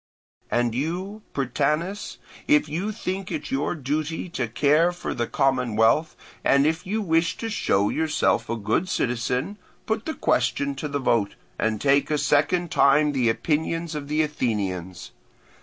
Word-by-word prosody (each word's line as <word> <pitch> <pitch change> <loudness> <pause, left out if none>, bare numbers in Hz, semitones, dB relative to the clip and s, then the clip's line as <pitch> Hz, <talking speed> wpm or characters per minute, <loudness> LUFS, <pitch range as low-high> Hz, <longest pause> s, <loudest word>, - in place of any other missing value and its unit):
"And 120 -1 +1
you, 180 - -3
Prytanis, 150 - -1 0.3
if 150 0 +4
you 175 +8 -2
think 195 -3 -4
it 150 -3 -4
your 140 +5 0
duty 155 +4 -3
to 130 -7 -2
care 150 +8 +3
for 175 - -5
the 120 -1 -2
commonwealth, 125 +2 +2 0.3
and 140 +1 +4
if 160 +4 0
you 215 +3 -1
wish 165 -2 +1
to 225 -1 -4
show 100 - +1
yourself 155 -7 +1
a 115 - 0
good 110 - -1
citizen, 125 - -1 0.3
put 220 0 -2
the 315 - -2
question 285 0 +1
to 160 - -4
the 145 -1 -2
vote, 115 -6 +1 0.2
and 110 -1 0
take 140 +2 +3
a 150 - +1
second 155 +5 +1
time 145 +2 +4
the 130 -5 +2
opinions 160 +6 -1
of 150 -2 -5
the 155 +2 +1
Athenians. 95 - -3
150 Hz, 155 wpm, -24 LUFS, 125-170 Hz, 0.3 s, if